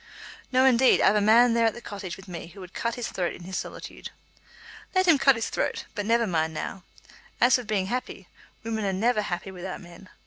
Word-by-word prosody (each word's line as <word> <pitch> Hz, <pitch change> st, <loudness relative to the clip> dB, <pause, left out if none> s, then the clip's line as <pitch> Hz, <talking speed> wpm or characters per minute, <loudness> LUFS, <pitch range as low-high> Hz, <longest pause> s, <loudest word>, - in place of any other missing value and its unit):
"No, 260 Hz, 0 st, +4 dB
indeed. 260 Hz, 0 st, +5 dB
I've 210 Hz, -, +4 dB
a 210 Hz, -, +3 dB
man 230 Hz, +3 st, +5 dB
there 230 Hz, -1 st, +3 dB
at 225 Hz, -, -1 dB
the -, -, -7 dB
Cottage 200 Hz, -5 st, -7 dB
with 195 Hz, -, -14 dB
me 175 Hz, -2 st, -7 dB
who 180 Hz, +4 st, -14 dB
would 185 Hz, -1 st, -11 dB
cut 235 Hz, 0 st, -2 dB
his 240 Hz, -1 st, -4 dB
throat 175 Hz, -2 st, -2 dB
in 175 Hz, -, -12 dB
his 185 Hz, +2 st, -7 dB
solitude." -, -, -6 dB, 0.9 s
"Let 370 Hz, 0 st, +3 dB
him 320 Hz, -5 st, +6 dB
cut 275 Hz, -1 st, +5 dB
his 225 Hz, 0 st, -3 dB
throat; -, -, -2 dB
but 205 Hz, -2 st, -4 dB
never 230 Hz, +1 st, +3 dB
mind 160 Hz, -4 st, -1 dB
now. 185 Hz, +4 st, -5 dB, 0.6 s
As 245 Hz, +1 st, +5 dB
for 250 Hz, -, +3 dB
being 210 Hz, -4 st, -1 dB
happy, 250 Hz, +6 st, -4 dB, 0.4 s
women 220 Hz, -1 st, -3 dB
are 195 Hz, -1 st, 0 dB
never 215 Hz, +3 st, +1 dB
happy 190 Hz, -1 st, -4 dB
without 185 Hz, 0 st, -6 dB
men. 180 Hz, 0 st, -14 dB
210 Hz, 220 wpm, -26 LUFS, 185-235 Hz, 0.9 s, him